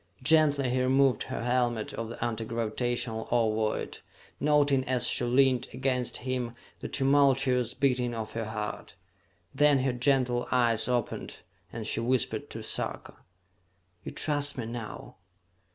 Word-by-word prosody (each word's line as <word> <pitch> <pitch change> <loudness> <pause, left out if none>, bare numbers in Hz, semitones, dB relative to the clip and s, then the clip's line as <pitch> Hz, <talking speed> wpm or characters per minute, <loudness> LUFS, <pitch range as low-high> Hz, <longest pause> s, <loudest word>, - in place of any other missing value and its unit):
Gently 145 -3 +3
he 130 0 +1
removed 130 -1 +3
her - - -4
helmet 120 -2 0
of 115 -1 -5
the 115 - -4
anti 115 -1 -3
gravitational 115 0 -2
ovoid, 110 -2 0 0.4
noting 145 -2 +3
as 130 -2 +1
she - - +2
leaned 130 0 +3
against 130 -1 -1
him 125 -2 -2 0.2
the - - -5
tumultuous 135 -3 +2
beating 125 -3 0
of 110 -1 -5
her 115 0 -4
heart. 105 -1 -5 0.6
Then 145 -1 +4
her 130 -2 +1
gentle 125 -1 +1
eyes 120 -3 +3
opened 125 -2 -3 0.3
and 115 -2 -6
she - - 0
whispered 125 +1 0
to - - -7
Sarka. - - -4 0.9
"You - - -6
trust 145 -2 0
me 120 - -3
now?" 115 -1 -7
125 Hz, 135 wpm, -28 LUFS, 115-135 Hz, 0.9 s, Then